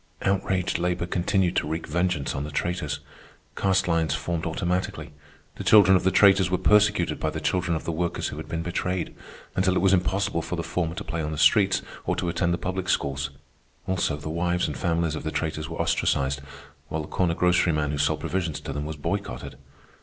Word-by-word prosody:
Outraged 95 -2 0
labor 90 0 0
continued 90 +1 +1
to - - +1
wreak 80 +2 -3
vengeance 90 -2 0
on 70 - -3
the 75 - -5
traitors. 75 -2 -2 0.5
Caste 95 0 +2
lines 80 -3 +1
formed 85 +1 -2
automatically. 90 0 -2 0.4
The - - -5
children 100 -3 +7
of 90 - +2
the 95 - +4
traitors 95 -2 +5
were 90 - +1
persecuted 100 0 +3
by - - 0
the - - -4
children 90 -2 0
of 80 - -4
the - - -2
workers 85 +1 -2
who - - -7
had - - -7
been 80 0 -2
betrayed, 90 0 -2 0.4
until 95 0 +2
it - - +2
was 95 0 +4
impossible 95 -1 +1
for 85 +3 -4
the 85 - -3
former 80 0 -2
to - - -5
play 85 - -3
on 75 0 -3
the 80 - -4
streets 95 +5 +4 0.2
or - - +1
to 90 - -1
attend 85 +1 0
the 85 - +1
public 90 +1 -3
schools. 70 0 0 0.6
Also, 90 -5 0
the 75 - -8
wives 85 +2 0
and 75 - -4
families 85 -2 0
of 75 - -4
the 80 - -2
traitors 80 0 -3
were 80 - -6
ostracized, 70 0 +1 0.5
while 80 0 -2
the - - -9
corner 85 -3 0
groceryman 85 -5 +2
who 75 - -3
sold 75 - +1
provisions 90 -5 -2
to - - -5
them 75 +1 -3
was 80 - -5
boycotted. 60 -4 -4
85 Hz, 205 wpm, -25 LUFS, 80-95 Hz, 0.6 s, children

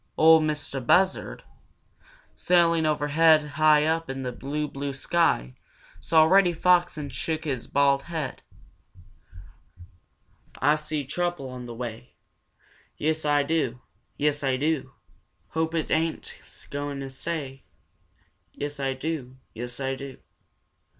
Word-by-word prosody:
'Ol 160 0 +7
Mistah 150 -3 -2
Buzzard, 185 +10 +1 0.9
sailing 170 -2 +3
overhead 155 +1 +3
high 150 +1 +4
up 165 0 0
in 135 0 -4
the 125 - -3
blue, 145 +5 -3
blue 140 -1 -5
sky, 135 - +1 0.5
saw 160 -1 +4
Reddy 180 +2 +5
Fox 175 0 +3
and 145 -3 -6
shook 155 +5 -3
his 135 -6 -3
bald 140 -1 +3
head: 155 -3 -5 2.2
"Ah 145 +2 +4
see 150 -1 -4
Trouble 175 0 -2
on 125 -1 -8
the 120 - -8
way; 120 0 -7 0.8
Yes, 155 0 -1
Ah 145 -1 +3
do! 140 -5 -1 0.4
Yes, 145 0 0
Ah 130 -1 +1
do! 155 +1 -1 0.6
Hope 160 +1 -1
it 160 - -2
ain't 160 0 -1
a - - -12
gwine 145 -1 -4
to 135 - -6
stay; 135 -2 -5 0.9
Yes, 145 0 -6
Ah 135 -1 0
do! 130 -2 -5 0.2
Yes, 120 +2 -5
Ah 135 0 -1
do! 135 -1 -9
150 Hz, 130 wpm, -26 LUFS, 135-160 Hz, 2.2 s, Ol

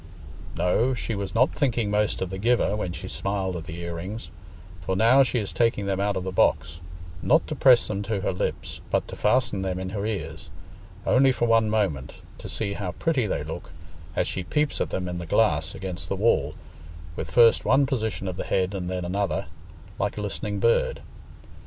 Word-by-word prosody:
No, 110 +9 +2
she 115 - -3
was 100 -3 -4
not 125 +4 +4
thinking 120 -7 0
most 105 -2 +1
of 95 - -5
the 95 - -4
giver 115 -1 +2
when 100 -4 -3
she 80 - -6
smiled 95 -2 -2
at 85 -2 -6
the 80 +1 -7
ear 85 0 -4
rings, 100 +7 -6 0.5
for 95 +2 -2
now 115 +7 +6
she 130 -1 +2
is 105 -4 -2
taking 115 -4 +1
them 95 -1 -1
out 100 0 +1
of 95 - -3
the 95 - -3
box, 85 -3 +1 0.4
not 155 +5 +3
to 155 - -4
press 130 -3 +5
them 100 -1 -2
to 105 -1 -2
her 95 - -1
lips, 90 - -4
but - - 0
to - - -6
fasten 115 -2 +1
them 95 -1 -2
in 95 0 -4
her 100 -1 -3
ears—only 105 +3 -1
for 125 - 0
one 115 -1 +4
moment, 95 -12 -1 0.3
to - - -8
see 100 -3 -2
how 95 -3 -4
pretty 140 - 0
they 75 - -2
look, 80 +1 -7 0.5
as - - +1
she 95 - -3
peeps 150 +10 0
at - - 0
them 90 -1 -3
in 90 0 -4
the 85 - -7
glass 80 -4 +2
against 95 -4 -5
the - - 0
wall, 95 -8 +2 0.6
with 80 - -5
first 115 +7 +5
one 130 +5 +4
position 110 -7 -2
of 90 -1 -4
the - - -2
head 95 +1 0
and 90 -2 -3
then 90 -1 -3
another, 95 -2 -1 0.5
like - - -1
a - - -2
listening 105 0 -3
bird. 115 +3 +2
100 Hz, 205 wpm, -25 LUFS, 90-115 Hz, 0.6 s, now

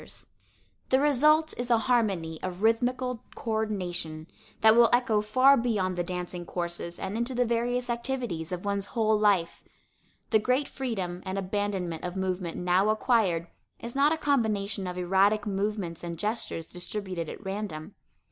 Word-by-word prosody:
[Illustration: - - -12
VIVIENNE - - -38
SEGAL] - - -41
The 260 +2 +3 0.3
result 310 0 +1
is 245 0 -3
a 235 - +5
harmony 200 -10 0
of 185 +2 -5
rhythmical 250 +2 +1
coördination 185 -8 -3 0.4
that 220 0 +7
will 235 0 +7
echo 230 -4 +3
far 255 +6 +5
beyond 210 -7 0
the 175 - -1
dancing 180 0 -5
courses 170 0 -4
and 190 +2 -4
into 235 +3 -2
the 245 0 +2
various 240 +2 0
activities 235 -9 -3
of 180 +1 -4
one's 200 -1 -1
whole 220 -1 +3
life. 200 -5 +2 0.7
The 220 - +5
great 255 +6 +1
freedom 190 -9 -4
and 190 0 -4
abandonment 190 -3 -2
of 180 +1 -4
movement 185 -2 -2
now 180 +3 +2
acquired 215 -7 +2 0.3
is 235 0 -7
not 280 +2 +4
a 325 - +1
combination 215 -9 0
of 180 0 -5
erratic 195 +4 +2
movements 195 -4 -2
and 170 -1 -5
gestures 210 -4 -3
distributed 180 -1 -5
at 205 - -9
random. 195 -3 -5
205 Hz, 160 wpm, -28 LUFS, 180-235 Hz, 0.7 s, that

